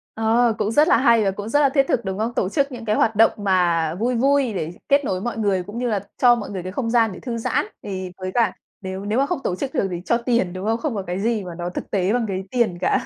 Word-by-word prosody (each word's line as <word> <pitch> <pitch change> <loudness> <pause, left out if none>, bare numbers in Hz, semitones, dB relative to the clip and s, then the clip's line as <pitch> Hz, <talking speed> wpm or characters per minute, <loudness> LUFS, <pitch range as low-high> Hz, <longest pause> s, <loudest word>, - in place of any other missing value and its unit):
Ờ, 225 +1 +2
cũng 215 -1 -1
rất 300 +7 +4
là - - +5
hay 235 -4 +4
và 195 - +1
cũng 205 +2 -6
rất 290 - +3
là 285 -2 +4
thiết 275 0 +2
thực, 235 - 0
đúng 190 0 -3
không? 225 +3 -2
Tổ 185 - 0
chức 280 +5 0
những 240 -3 -8
cái 215 -1 +1
hoạt 225 0 +2
động 225 +2 +5
mà 175 -5 +1
vui 240 +6 0
vui 270 -1 +2
để 165 -4 -3 0.2
kết 280 0 +4
nối 185 -4 -2
mọi 235 +1 -3
người 200 -4 +1
cũng 205 +5 -9
như 245 - -1
là 210 -3 0 0.2
cho 245 -1 +6
mọi 220 -4 -6
người 190 -3 -5
cái 185 - -5
không 230 +3 -2
gian 225 -2 +3
để - - -9
thư 240 -3 -4
giãn. 225 - 0 0.2
Thì 185 -2 -5
với 185 0 -5
cả 230 -6 +2 0.3
nếu 190 0 -6
nếu 215 +4 0
mà 275 - +3
không 335 +2 -2
tổ 180 - -1
chức 270 +7 -4
được 195 - +1
thì 175 -1 -4
cho 235 - +2
tiền, 235 -7 0
đúng 185 +1 -6
không? 225 +1 +1
Không 270 -1 -3
có 200 - -2
cái 180 +1 -4
gì 220 0 0
mà 175 -2 -7
nó 175 +1 -4
thực 180 - -7
tế 195 +1 +1
bằng 245 -1 +1
cái 190 -1 -3
tiền 235 -8 +1
cả. - - +1
220 Hz, 305 wpm, -22 LUFS, 190-240 Hz, 0.3 s, cho